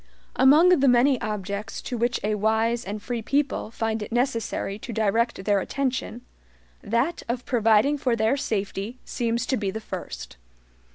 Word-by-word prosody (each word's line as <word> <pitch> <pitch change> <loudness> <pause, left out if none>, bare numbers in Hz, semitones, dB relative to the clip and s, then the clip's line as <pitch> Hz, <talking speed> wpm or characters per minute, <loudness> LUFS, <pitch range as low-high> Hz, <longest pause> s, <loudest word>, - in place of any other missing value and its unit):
Among 300 +7 +6
the 280 -7 +4
many 250 +1 +4
objects 210 0 -4
to 250 - -4
which 240 +1 0
a 210 +1 0
wise 220 +3 +1
and 205 +2 -4
free 235 +2 -4
people 280 +1 -1
find 225 -1 -2
it 210 - -6
necessary 230 -4 -1
to 240 - -7
direct 220 -1 0
their 205 -1 +3
attention, 255 +1 -2 0.6
that 235 +10 0
of 240 +1 -2
providing 235 +3 +3
for 250 -3 +1
their 220 +3 +2
SAFETY 210 -2 -3
seems 235 0 -1
to 260 - 0
be 205 -2 -2
the 215 +3 -4
first. 60 - -7
230 Hz, 160 wpm, -25 LUFS, 210-255 Hz, 0.6 s, Among